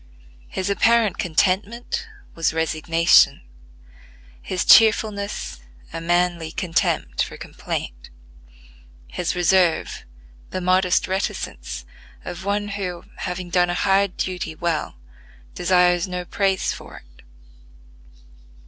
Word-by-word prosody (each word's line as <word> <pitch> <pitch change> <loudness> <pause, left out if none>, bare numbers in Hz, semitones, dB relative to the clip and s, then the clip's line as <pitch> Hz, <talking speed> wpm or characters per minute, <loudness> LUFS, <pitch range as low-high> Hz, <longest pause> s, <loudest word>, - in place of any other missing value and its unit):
His 190 - -4
apparent 225 +1 +2
contentment 215 - 0 0.3
was 165 -1 -1
resignation; 165 - +3 1.0
his 185 - -2
cheerfulness, 210 - +4 0.3
a 165 - -4
manly 175 -1 0
contempt 165 -1 0
for - - -8
complaint; - - -6 1.0
his 175 -1 -2
reserve, 180 -1 +2 0.5
the 185 - -3
modest 185 0 +2
reticence 65 - -4 0.4
of 175 - -6
one 205 +1 -1
who, 185 -4 -4
having 180 -1 -5
done 175 0 +3
a 175 - -1
hard 195 0 +2
duty 180 -3 -3
well, 165 - -2 0.6
desires 180 0 +3
no 180 -1 -4
praise 195 0 0
for - - -11
it. 60 0 -23
180 Hz, 100 wpm, -22 LUFS, 170-200 Hz, 1.0 s, cheerfulness